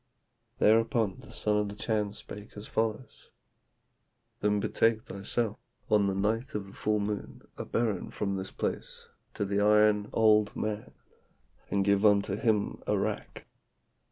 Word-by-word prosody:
"Thereupon 110 -2 +3
the - - -14
son 105 0 0
of 105 -1 0
the 100 - -7
Chan 105 -1 -1
spake 105 0 -10
as 105 - -7
follows: 110 +3 -3 1.1
'Then 105 0 +2
betake 110 +2 +1
thyself 105 +2 -3 0.3
on 105 -2 +4
the 95 - 0
night 110 +6 -1
of 105 -2 -2
the 95 - -13
full 105 0 0
moon 105 0 -4
a - - -6
berren 110 -5 -1
from 100 -1 -2
this 95 0 -4
place - - -4 0.3
to 100 - -1
the 100 +1 0
iron 105 0 +4
old 105 -2 +4
man, 105 0 -4 0.7
and 100 -1 +1
give 100 0 +3
unto 100 -1 +4
him 105 -1 0
arrack. 105 +1 -2
105 Hz, 145 wpm, -29 LUFS, 100-110 Hz, 1.1 s, on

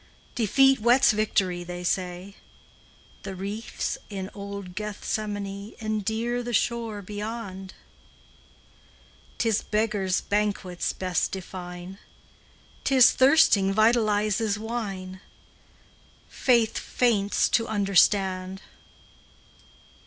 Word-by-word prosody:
Defeat 270 +4 +4
whets 240 +4 +5
victory, 195 -4 0
they 175 0 -7
say; 180 +2 -3 0.9
The 195 -1 -6
reefs 200 +4 -4
in 195 -1 -6
old 200 -2 -7
Gethsemane 205 0 -4
Endear 220 +2 -2
the 240 0 -5
shore 225 -2 -1
beyond. 205 -2 -6 1.6
'T - - 0
is 220 -2 +2
beggars 210 -3 0
banquets 205 -4 -1
best 185 -2 -1
define; 180 0 -8 0.8
'T 270 - +1
is 255 -1 +8
thirsting 260 -9 +4
vitalizes 215 -2 +2
wine, 195 -5 -5 1.1
Faith 235 -4 +2
faints 210 -5 +1
to 230 0 +1
understand. 195 -2 +2
205 Hz, 85 wpm, -26 LUFS, 190-225 Hz, 1.6 s, is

